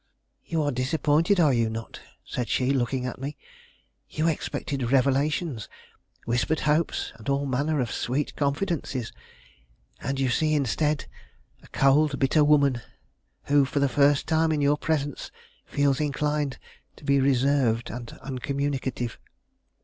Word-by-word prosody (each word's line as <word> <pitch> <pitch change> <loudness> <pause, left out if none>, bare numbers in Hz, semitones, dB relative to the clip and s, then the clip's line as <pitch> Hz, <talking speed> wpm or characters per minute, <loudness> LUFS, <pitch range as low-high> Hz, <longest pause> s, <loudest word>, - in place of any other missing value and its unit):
"You 160 -2 -1
are 145 - 0
disappointed, 150 +8 +2
are 150 -5 +5
you 115 -2 +2
not?" 110 0 -6 0.3
said 125 -2 -4
she, 130 +1 +1
looking 130 -1 0
at 125 0 -5
me. 140 +2 -5 0.7
"You 155 +1 0
expected 140 -5 -2
revelations, 140 - +1 0.6
whispered 125 +7 0
hopes, 150 +2 0
and 110 +3 -7
all 140 +1 +1
manner 140 +3 0
of 120 -3 -1
sweet 135 +4 -2
confidences; 140 -4 -2 0.9
and 135 +2 -3
you 135 -1 +1
see, 155 +4 +2
instead, 150 +2 0 0.6
a - - -17
cold, 140 +1 +3
bitter 140 +3 +3
woman, 140 -4 +3 0.6
who 145 0 +4
for 135 +2 -3
the 140 - +3
first 140 +2 +3
time 160 0 +2
in 155 - +1
your 145 0 +3
presence 145 -3 -2 0.4
feels 140 -2 +1
inclined 150 -1 -1 0.4
to - - -18
be 140 -1 +3
reserved 130 -3 +2
and 120 -1 -7
uncommunicative." 135 -2 -3
140 Hz, 135 wpm, -26 LUFS, 130-150 Hz, 0.9 s, are